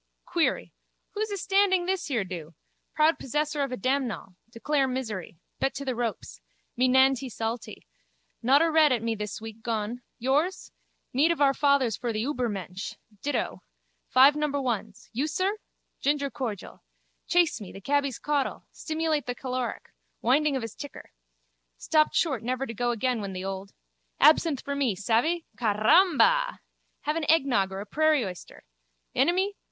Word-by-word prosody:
Query. 340 -3 0 0.4
Who's 435 +1 -2
astanding 390 -2 +2
this 375 0 -1
here 245 -8 0
do? 170 -4 -8 0.4
Proud 310 +2 +3
possessor 295 +2 -1
of 275 - 0
damnall. 255 -7 -1 0.2
Declare 270 +4 0
misery. 220 -10 -4 0.2
Bet 270 - 0
to 280 - -5
the 260 - -1
ropes. 235 -2 -4 0.3
Me 255 +2 +3
nantee 265 0 +4
saltee. 225 0 -5 0.6
Not 275 +6 +5
a 330 - +2
red 310 -2 +5
at 240 -3 +1
me 230 0 0
this 210 -1 -5
week 225 0 -9
gone. 225 +1 -3 0.2
Yours? 290 +9 0 0.4
Mead 285 +6 +4
of 335 - 0
our 280 -1 +5
fathers 275 -6 +2
for 240 - -2
the 215 0 -2
Übermensch. 210 -9 -3 0.3
Dittoh. 290 - -2 0.5
Five 270 +3 +7
number 300 -1 0
ones. 220 -5 -3
You, 270 +7 0
sir? 375 +6 0 0.4
Ginger 280 0 0
cordial. 225 -8 -5 0.5
Chase 345 -7 +2
me, 195 - -8
the - - -10
cabby's 280 +3 0
caudle. 290 -2 -1
Stimulate 315 -3 -2
the 245 - -2
caloric. 255 -2 -4 0.3
Winding 280 +4 +3
of 260 - -2
his 225 -1 -6
ticker. 285 -2 -10 0.7
Stopped 310 -1 +2
short 270 -10 +1
never 255 +3 -2
to 230 - -6
go 240 +2 -1
again 240 0 0
when 195 -1 -5
the 185 0 -5
old. 195 0 -5 0.5
Absinthe 305 -2 +5
for 280 - -3
me, 265 -8 +1
savvy? 235 - +1
Caramba! 360 - +4 0.4
Have 300 +2 -1
an 310 -3 -2
eggnog 265 -11 +3
or 190 +1 -5
a - - -7
prairie 310 -1 +2
oyster. 180 -2 -9 0.5
Enemy? 360 +9 +2
265 Hz, 155 wpm, -27 LUFS, 225-305 Hz, 0.7 s, Five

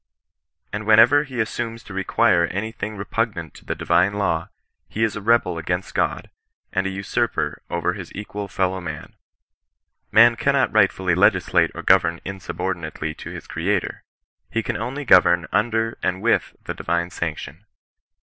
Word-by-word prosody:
And 105 +1 -4
whenever 115 +7 +6
he 130 -3 -7
as 110 - -1
sumes 115 -1 -4
to 105 - -10
require 95 -1 +2
any 100 +6 -4
thing 110 -1 -6
repugnant 100 -2 -3
to - - -16
the - - -3
divine 90 +4 +2
law, 85 -5 -1 0.4
he 110 - -2
is 110 -3 0
a 105 - -5
rebel] 100 -6 +2
against 90 +3 -3
God, - - -1 0.4
and 95 0 0
a - - -1
usurper 95 +1 -2
over - - -1
his - - -8
co - - -7
equal 105 -1 -6
fellow 95 0 -1
man. 80 -4 -7 1.0
Man 115 +2 +7
cannot 140 -1 +1
rightfully 95 -4 +3
legislate 90 0 +3
or - - -6
govern 85 0 +3
inrsubordinatel^ 90 -4 -4
to - - -8
his - - -8
Creator, 90 +4 -2 0.5
lie 115 - +2
can 115 - -3
only 130 +7 -4
govern 90 -5 +5
under 115 0 0
and 95 - -1
with 115 - +1
the - - -4
divine 85 0 -2
sanction. 80 +3 -5
100 Hz, 160 wpm, -22 LUFS, 90-115 Hz, 1.0 s, Man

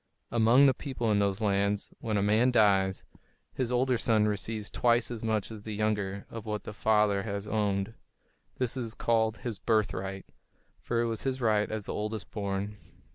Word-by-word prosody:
Among 120 +4 +5
the 135 - +5
people 125 -6 -2
in 105 - +3
those 100 +1 0
lands, 100 0 0
when 110 -2 -1
a 100 - +1
man 110 +5 +4
dies, 100 -5 +3 0.5
his 125 -2 -2
older 125 0 +2
son 110 -3 +3
receives 105 +1 -2
twice 120 0 +2
as 115 -2 -5
much 110 -1 -1
as 110 -2 -8
the 105 0 -5
younger 100 -2 -1
of 115 -1 -7
what 105 -1 -3
the 105 - -7
father 105 -2 +2
has 100 -1 -4
owned. 105 -1 0 0.6
This 125 -1 0
was 120 -3 -4
called 110 -1 +1
his 115 -6 -5
"birthright," 100 -3 -1 0.5
for 115 -1 -1
it - - +1
was 115 -2 -2
his 130 -1 -2
right 110 -3 +2
as 110 -2 -4
the - - -4
oldest 105 0 -4
born. 100 0 -3
110 Hz, 185 wpm, -29 LUFS, 100-115 Hz, 0.6 s, Among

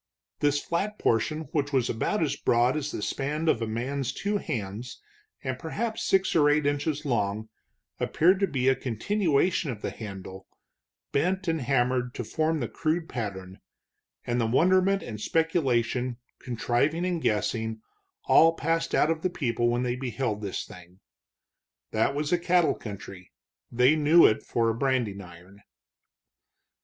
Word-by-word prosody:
This 145 0 +2
flat 200 +8 -2
portion, 155 +8 +1
which 145 -3 -1
was 130 -4 +2
about 165 - 0
as 150 - 0
broad 120 +3 +2
as 150 -1 -2
the 105 - -5
span 150 +7 -2
of 120 -7 +2
a 115 - -1
man's 125 +4 -2
two 205 +1 -1
hands 115 - -5 0.4
and 130 -1 -3
perhaps 220 +7 -3
six 190 0 +2
or 150 -3 +5
eight 150 0 +2
inches 145 +1 -1
long, 110 -4 -1 0.5
appeared 185 +4 +3
to 195 - +2
be 130 -5 -1
a 135 - +5
continuation 160 - 0
of 110 -5 -6
the - - -2
handle, 95 -3 -9 0.6
bent 185 +6 0
and 160 -2 0
hammered 125 -1 0
to - - -3
form 160 -1 -1
the 120 - -1
crude 160 +5 -1
pattern, 95 -6 -5 0.7
and 120 0 0
the 115 - +1
wonderment 185 +9 +3
and 105 -3 -7
speculation, 130 -7 0 0.2
contriving 130 +7 0
and 175 -3 -1
guessing, 110 0 -1 0.5
all 165 +1 +6
passed 165 +3 0
out 155 - +3
of 160 -1 -2
the 185 - 0
people 120 -7 0
when 120 +1 0
they 125 -1 -1
beheld 120 -4 -3
this 100 -3 -4
thing. 90 +1 -14 0.9
That 110 +5 +1
was 150 +1 -2
a 175 - +3
cattle 175 -1 +3
country; 100 -3 -9 0.4
they 125 +5 +4
knew 155 +2 +6
it 110 - +3
for 115 -1 0
a - - -4
branding 120 -6 0
iron. 90 +2 -14
130 Hz, 155 wpm, -27 LUFS, 115-160 Hz, 0.9 s, all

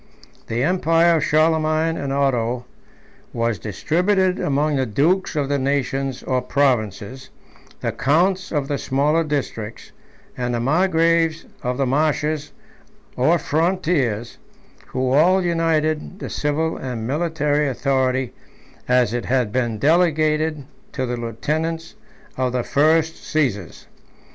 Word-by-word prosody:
The 120 +2 -1
empire 170 0 +3
of 150 - -1
Charlemagne 155 +1 +2
and 140 -3 -3
Otho 125 -3 0 0.7
was 115 -4 -1
distributed 180 - 0
among 145 +1 +1
the 130 -1 0
dukes 165 - +1
of 145 -2 0
the 140 0 0
nations 135 -1 -1
or 130 -1 0
provinces, 125 -3 -1 0.5
the - - -1
counts 180 +7 +1
of 145 -3 -1
the 140 -1 -2
smaller 150 +5 +1
districts, 130 -7 -4 0.4
and 125 -1 -2
the - - -1
margraves 165 +3 +2 0.2
of 125 -1 -2
the 135 - +1
marches 150 +2 0 0.6
or 155 +7 +3
frontiers, 155 - -1 0.5
who 130 0 -1
all 180 +7 +4
united 165 0 0
the - - -7
civil 155 +2 -1
and 120 -4 -5
military 150 +1 0
authority 130 -1 0 0.5
as 125 -3 +3
it 120 - -2
had 125 -4 0
been 120 -2 -1
delegated 155 0 +2 0.3
to 130 - -2
the 125 0 -2
lieutenants 155 +8 -3 0.4
of 130 -1 0
the 125 -1 0
first 160 +4 +2
Caesars. 120 - -1
145 Hz, 125 wpm, -21 LUFS, 125-160 Hz, 0.7 s, all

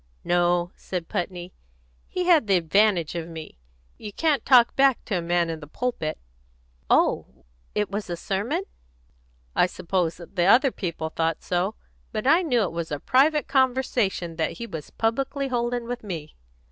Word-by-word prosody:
"No," 175 0 +2
said 180 -3 -5
Putney. 180 0 -4 0.5
"He 365 - -2
had 330 -10 +5
the 195 -2 +4
advantage 175 0 +2
of 170 -1 -4
me. 160 - -9 0.4
You 210 - -7
can't 300 +5 +1
talk 245 -3 +5
back 270 -2 +5
at - - +2
a 175 - 0
man 170 0 +1
in 160 - -5
the 145 - -10
pulpit." 160 - -3 0.7
"Oh, - - +1 0.3
it 210 -1 0
was 205 -1 -4
a 175 - -3
sermon?" 210 - -2 0.9
"I - - +4
suppose 175 -2 -1
the 175 +1 -2
other 255 +7 +5
people 165 -6 -4
thought 165 0 -1
so. 185 +4 -1 0.4
But 215 +1 -3
I 325 +6 +5
knew 250 -10 +2
it 185 - -2
was 170 -1 -4
a 145 - -2
private 295 - +3
conversation 245 - +1
that 160 -2 0
he 235 - -6
was 160 -9 -7
publicly 270 +4 -1
holding 240 -1 -1
with 245 0 -5
me." 165 -7 -6
195 Hz, 165 wpm, -25 LUFS, 170-245 Hz, 0.9 s, had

